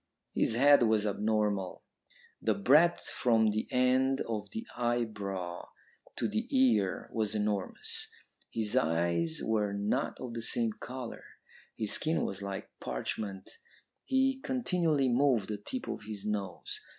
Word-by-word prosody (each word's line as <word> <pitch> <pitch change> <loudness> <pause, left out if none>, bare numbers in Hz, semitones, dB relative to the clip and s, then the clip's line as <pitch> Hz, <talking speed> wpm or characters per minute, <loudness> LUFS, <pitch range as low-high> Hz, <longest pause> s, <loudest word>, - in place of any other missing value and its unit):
His 110 - +2
head 140 +2 +6
was 110 -2 +3
abnormal. 105 -2 0 0.6
The - - +2
breadth 170 -3 +4
from 110 -3 +3
the 110 +1 -2
end 130 +1 +3
of 110 -3 -3
the 225 +1 -5
eyebrow 105 -7 -2 0.5
to - - 0
the 220 +3 -2
ear 255 - +2
was 110 -1 0
enormous. 105 -2 -2 0.4
His 110 -2 -2
eyes 85 0 +1
were 105 -2 +1
not 105 +7 -1
of 125 -2 -6
the 115 - -4
same 115 0 +3
colour; 125 -1 -7 0.5
his 110 -2 -1
skin 160 +1 +1
was 95 0 -3
like 100 -1 -5
parchment; 95 - -4 0.6
he 265 0 +2
continually 175 - +1
moved 120 -5 +2
the 105 -1 -3
tip 255 - -5
of - - -4
his 105 -2 -6
nose. 100 -4 -3
110 Hz, 135 wpm, -31 LUFS, 100-135 Hz, 0.6 s, head